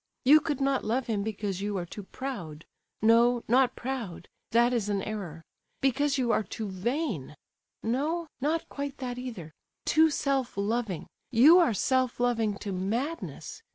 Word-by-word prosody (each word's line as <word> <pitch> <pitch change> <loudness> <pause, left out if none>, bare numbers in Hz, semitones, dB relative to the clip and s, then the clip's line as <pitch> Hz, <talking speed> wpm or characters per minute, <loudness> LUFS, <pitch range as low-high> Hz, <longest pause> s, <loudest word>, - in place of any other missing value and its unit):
You 295 +4 +8
could 295 -3 -2
not 275 -1 +1
love 240 +4 0
him 215 -3 -1
because 200 -2 -3
you 205 0 -2
are 175 - -3
too 205 - -8
proud—no, 230 - 0
not 250 +1 +3
proud, 235 -10 -5 0.2
that 240 +2 +4
is 220 -4 0
an 200 -2 0
error; 180 -7 -5 0.4
because 280 +2 +1
you 245 -3 +1
are - - +3
too 215 0 -5
vain—no, 240 - -3 0.2
not 315 +4 0
quite 280 0 -5
that 250 -2 -4
either; 200 -12 -7 0.3
too 315 +1 +5
self 275 -6 -1
loving; 205 -3 -1 0.2
you 285 +9 +7
are 320 - +3
self 255 +4 +1
loving 230 -4 +1
to 200 - -5
madness. 255 - -3
240 Hz, 150 wpm, -28 LUFS, 205-270 Hz, 0.4 s, You